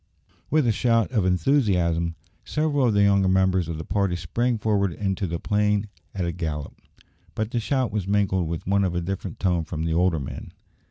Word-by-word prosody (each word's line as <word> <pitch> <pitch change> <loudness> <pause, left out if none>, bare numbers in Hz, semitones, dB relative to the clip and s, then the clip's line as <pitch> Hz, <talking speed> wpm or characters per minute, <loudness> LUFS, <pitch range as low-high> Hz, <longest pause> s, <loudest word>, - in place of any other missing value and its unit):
With 155 -3 +3
a 115 - +3
shout 115 +1 +2
of 105 -7 +1
enthusiasm, 90 - +1 0.3
several 150 -4 +1
of 110 - +1
the 100 - +5
younger 100 -1 +4
members 95 -2 +2
of 80 - -3
the 80 - -5
party 100 -2 0
sprang 115 +9 -1
forward 105 -3 +1
into 95 +1 -2
the 85 0 -2
plain 105 0 +1 0.3
at 95 -2 -1
a 85 - -1
gallop; 80 -4 -4 0.6
but 110 +1 -2
the 120 - 0
shout 130 -1 0
was 100 -3 -2
mingled 95 -3 +1
with 80 0 -4
one 100 +1 +2
of 90 -2 -1
a 90 - 0
different 95 0 -5
tone 90 -3 +1
from 80 0 -4
the 80 0 -1
older 85 -1 +2
men. 65 - -7
95 Hz, 200 wpm, -24 LUFS, 85-105 Hz, 0.6 s, the